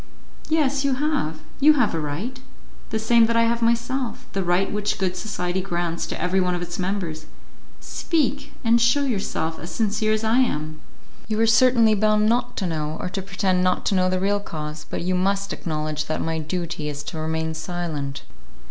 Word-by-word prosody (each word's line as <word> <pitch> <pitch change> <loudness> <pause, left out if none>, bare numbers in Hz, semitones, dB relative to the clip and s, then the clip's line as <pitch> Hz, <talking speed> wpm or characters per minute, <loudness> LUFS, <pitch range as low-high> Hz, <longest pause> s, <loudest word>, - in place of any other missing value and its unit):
"Yes, 285 -3 +2
you 275 -2 +2
have; 275 - -1 0.2
you 300 +2 +7
have 250 -8 +2
a 165 - -1
right, 175 - -4 0.5
the 220 - -1
same 225 +1 +4
that 230 - 0
I 230 - +5
have 235 0 +1
myself; 235 +2 0
the 195 - 0
right 175 +2 +1
which 210 0 -1
good 185 -1 -1
society 180 -1 -2
grants 175 -2 -2
to - - -5
every 185 +1 +2
one 180 -1 +1
of 175 - -4
its 175 +1 -6
members. 180 -4 -3 0.5
Speak, 290 -3 -1
and 235 0 +4
shew 245 +5 +4
yourself 195 -9 -2
as 170 - -7
sincere 215 0 +1
as 215 0 -1
I 225 +3 +3
am." 155 - -1 0.5
"You 215 -1 -1
are 225 - +5
certainly 230 -1 +5
bound 215 0 +3
not 245 +2 +1
to 190 - -1
know, 155 -2 -2
or - - -3
to 195 - -3
pretend 190 -1 0
not 185 0 +1
to - - +2
know 185 0 +3
the 185 0 0
real 200 +2 +1
cause, 150 -5 -6
but - - -3
you 185 +1 0
must 195 +2 0
acknowledge 155 -2 -3
that 155 - -1
my 160 0 -1
duty 165 -1 -3
is 145 0 -5
to 160 +2 -6
remain 160 0 -1
silent." 160 -4 -4
190 Hz, 195 wpm, -23 LUFS, 165-230 Hz, 0.5 s, you